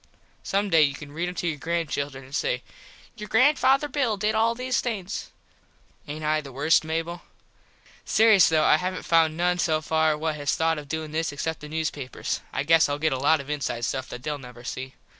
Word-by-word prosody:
Some 200 0 -1
day 160 - +6
you 140 -2 +3
can 145 0 -10
read 170 +4 -2
em 180 - -8
to 175 - -2
your 155 -3 -2
granchildren 145 -4 -3
an 135 - -16
say - - -1 0.5
"Your 210 -1 -8
Granfather 270 +3 +4
Bill 255 -7 0
did 210 +2 0
all 225 +1 +2
these 255 +1 -1
things." 210 -5 -4 0.8
Aint 155 +2 -6
I 155 0 +1
the 140 -2 -10
worst, 145 +6 +3
Mable? 165 +2 -3 0.8
Serious 220 -4 +5
though 155 -1 +3
I - - +6
havnt 185 0 -4
found 165 -1 +3
noone 180 +1 +1
so 155 -2 +2
far 160 0 +1
what 155 0 -2
has 145 -1 0
thought 165 -1 +1
of 145 -1 -11
doin 160 0 -4
this 160 0 -1
except 160 +3 -3
the 150 - -9
newspapers. 150 -4 -3
I - - -1
guess 160 0 +4
Ill 145 - -1
get 155 -1 +1
a 130 - -2
lot 150 +3 +3
of 140 +2 -7
inside 135 -5 -2
stuff 130 +1 -3
that 125 - -8
theyll 150 0 -3
never 125 -2 -12
see. 130 +1 -6
160 Hz, 210 wpm, -25 LUFS, 145-180 Hz, 0.8 s, day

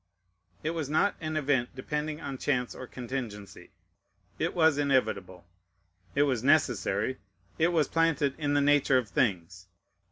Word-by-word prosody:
It 155 - 0
was 160 -4 -3
not 180 +7 +2
an 155 -1 -2
event 135 -4 0
depending 150 +3 -3
on 135 -5 -6
chance 125 -4 0
or 130 - -9
contingency. 120 -6 -7 0.7
It - - -1
was 160 -4 +4
inevitable; 105 -11 0 0.7
it 140 - +4
was 130 -5 0
necessary; 130 -5 +2 0.4
it 160 - +4
was 165 -5 +2
planted 160 -4 +1
in 145 -1 0
the 145 - +4
nature 145 -2 +4
of 120 -5 -1
things. 95 -4 -1
135 Hz, 140 wpm, -29 LUFS, 120-150 Hz, 0.7 s, was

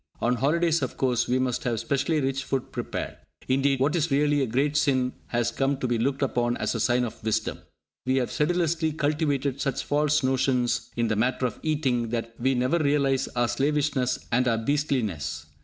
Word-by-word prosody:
On 120 +1 +1
holidays, 165 +5 +2
of 130 - -3
course, 125 -3 +1
we 125 - +2
must 130 -2 -1
have 115 -3 -1
specially 140 +6 0
rich 135 0 -1
food 135 -2 -3
prepared! - - -4 0.3
Indeed, 135 +1 +2
what 145 +4 +2
is 165 -1 +1
really 145 +1 +2
a 135 - +1
great 140 +6 0
sin 130 -4 +2
has 120 0 0
come 135 +3 0
to 130 - -2
be 120 -1 0
looked 135 +4 0
upon 120 -2 0
as - - -1
a - - -2
sign 125 0 +2
of 115 - -6
wisdom! 110 -1 -1 0.5
We 130 - +2
have 130 -2 0
sedulously 165 0 +1
cultivated 145 -3 0
such 135 0 -1
false 150 0 +1
notions 130 -2 +1
in 115 -1 +1
the 110 - 0
matter 125 +4 +1
of 120 - -3
eating 135 -7 0
that 115 0 -3
we 130 +2 +2
never 130 +7 +1
realise 140 -3 +2
our 120 0 +2
slavishness 140 -2 0
and 125 +2 +2
our 115 -2 +2
beastliness. 110 - -1
130 Hz, 190 wpm, -26 LUFS, 120-145 Hz, 0.5 s, holidays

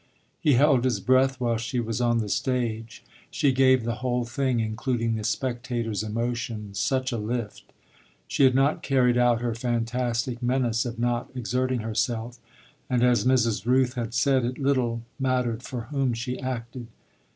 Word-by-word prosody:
He 150 - +3
held 135 -1 +4
his 130 -2 +1
breath 130 +1 +2
while 120 -2 0
she 115 +2 -3
was 115 0 -2
on 120 -1 +2
the 110 -2 -1
stage 115 -1 -2 0.3
she 140 - +2
gave 130 -1 +4
the 115 +1 -2
whole 125 -1 0
thing, 130 0 -1
including 115 +1 -1
the 110 -1 -3
spectator's 120 -2 -2
emotion, 115 -1 -3
such 130 +7 0
a 120 - -2
lift. 110 0 -4 0.6
She - - +1
had 130 -1 +5
not 135 +3 +2
carried 125 -3 +2
out 120 -1 +3
her 120 -1 -1
fantastic 120 +1 -2
menace 120 -2 +1
of 120 -1 -6
not 120 0 -1
exerting 125 +1 -1
herself, 115 +2 -2 0.5
and, 125 -2 +2
as 125 -3 +3
Mrs. 115 -4 +2
Rooth 130 0 +3
had 120 -2 -4
said, 130 0 +3
it 125 +2 -2
little 130 -5 0 0.2
mattered 125 -3 0
for 125 -1 -5
whom 135 -4 0
she 125 +2 -4
acted. 120 -2 -5
120 Hz, 160 wpm, -26 LUFS, 115-130 Hz, 0.6 s, had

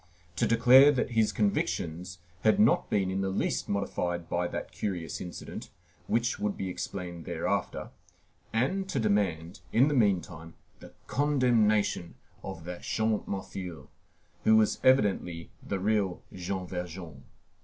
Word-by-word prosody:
to - - +1
declare 125 +5 +7
that 130 -2 -1
his 110 -2 +2
convictions 90 - -1 0.3
had 110 - +4
not 110 +2 +4
been 95 -2 +1
in 95 +1 -1
the 95 - 0
least 95 - -1
modified 90 -4 -2
by 90 0 0
that - - -5
curious 90 -5 -4
incident, 90 - -7 0.4
which 115 +1 0
would 105 -1 -1
be 95 - -3
explained 90 -2 -5
thereafter, - - -2 0.6
and 185 +13 0
to 135 - -1
demand, 95 -6 0
in 130 +6 +4
the - - 0
meantime, 90 - 0 0.2
the - - -12
condemnation 115 - +2 0.3
of 95 -4 -7
that 90 +1 -7
Champmathieu, 100 -5 -3 0.5
who 110 - +6
was 110 -1 +3
evidently 100 -10 +2
the 100 - -3
real 100 -2 0
Jean 95 +1 -4
Valjean. 90 -6 -7
100 Hz, 135 wpm, -29 LUFS, 90-115 Hz, 0.6 s, declare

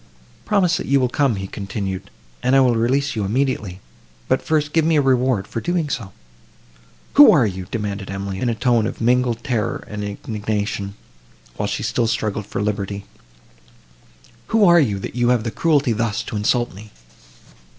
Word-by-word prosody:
"Promise, 185 -4 +2
that - - -5
you 140 0 +3
will 125 -1 +1
come," 135 -2 +1
he 95 0 -4
continued, 95 -1 -5 0.3
"and 130 +2 +2
I - - +6
will 130 -2 +4
release 130 +5 +1
you 105 - -1
immediately; 105 -4 -1 0.5
but - - +1
first 150 -2 0
give 160 - +3
me 160 +1 +2
a - - +4
reward 130 -6 +2
for 115 - -5
so - - -10
doing." 170 -4 0 1.2
"Who 290 0 +9
are 135 -6 +4
you?" 95 -3 -4
demanded 100 -3 -4
Emily, 95 0 -4
in 125 - 0
a 115 - -1
tone 115 -1 +2
of - - -6
mingled 120 0 +1
terror 120 -7 -2
and 105 0 -5
indignation, 105 -1 -3 0.6
while - - -2
she - - -3
still 115 - 0
struggled 105 -2 -2
for 100 - -3
liberty—"who 100 -1 -3 1.6
are 175 -1 +7
you, 110 -10 +1
that 95 - -7
have 120 -1 +2
the 115 - -3
cruelty 145 +1 +2
thus 110 -2 -1
to - - -7
insult 120 +3 0
me?" 105 +3 -12
115 Hz, 170 wpm, -21 LUFS, 100-135 Hz, 1.6 s, Who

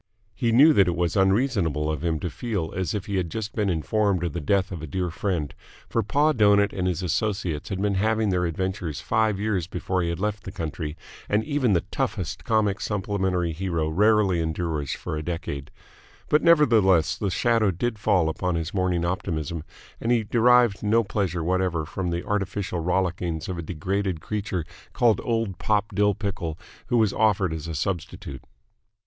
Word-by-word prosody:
He 115 +1 0
knew 145 +7 +7
that 100 -7 +5
it 85 - 0
was 85 0 0
unreasonable 95 - +2
of 75 -1 -2
him 80 -2 0
to 90 - -2
feel 100 -10 -3
as 95 -2 -1
if 100 - -3
he 100 -2 -2
had 90 -3 -1
just 110 +3 -4
been 105 -3 0
informed 95 +2 +1
of 85 - -2
the 85 - -3
death 95 +5 +1
of 85 -4 -5
a 80 - -6
dear 90 +2 -2
friend, 85 -5 -2 0.3
for 115 - 0
Pa 145 +8 +2
Doughnut 105 -5 +4
and 90 -1 -1
his 90 0 -1
associates 90 -3 -1
had 95 -2 -3
been 100 0 +1
having 110 +2 +1
their 90 -2 +1
adventures 90 -2 -3
five 110 -3 +1
years 100 -5 -1
before 90 0 -2
he 85 - -1
had 85 - -3
left 105 +1 -2
the 95 - -7
country, 80 -2 -5 0.3
and 105 +1 +2
even 140 -6 +1
the 85 - +1
toughest 95 +2 -2
comic 110 -4 +1
supplementary 95 -4 -1
hero 85 -2 -2
rarely 100 +1 +3
endures 80 -3 -2
for - - -4
a 75 - -3
decade: 80 -4 -4 0.6
but 150 - +4
nevertheless 110 - +4
the 100 - -2
shadow 115 +2 +2
did 110 +5 -2
fall 95 -6 +2
upon 90 +2 -1
his 80 +1 -3
morning 90 -3 0
optimism, 85 -3 -3 0.4
and 115 - -1
he 120 -2 +3
derived 120 -1 +4
no 110 +2 +3
pleasure 95 -5 -2
whatever 90 -2 0
from 90 +3 -3
the 85 0 -3
artificial 95 -2 -2
rollickings 90 -2 -1
of 90 -2 -4
a - - -2
degraded 90 +2 -2
creature 100 -3 -3 0.3
called 115 -5 +3
Old 115 -5 -1
Pop 105 0 0
Dill 105 0 +2
Pickle 95 -6 -4 0.3
who 120 -1 +2
was 110 -3 +3
offered 100 -5 +2
as 80 0 -5
a 80 - -4
substitute. 80 -5 -4
95 Hz, 185 wpm, -25 LUFS, 85-105 Hz, 0.6 s, knew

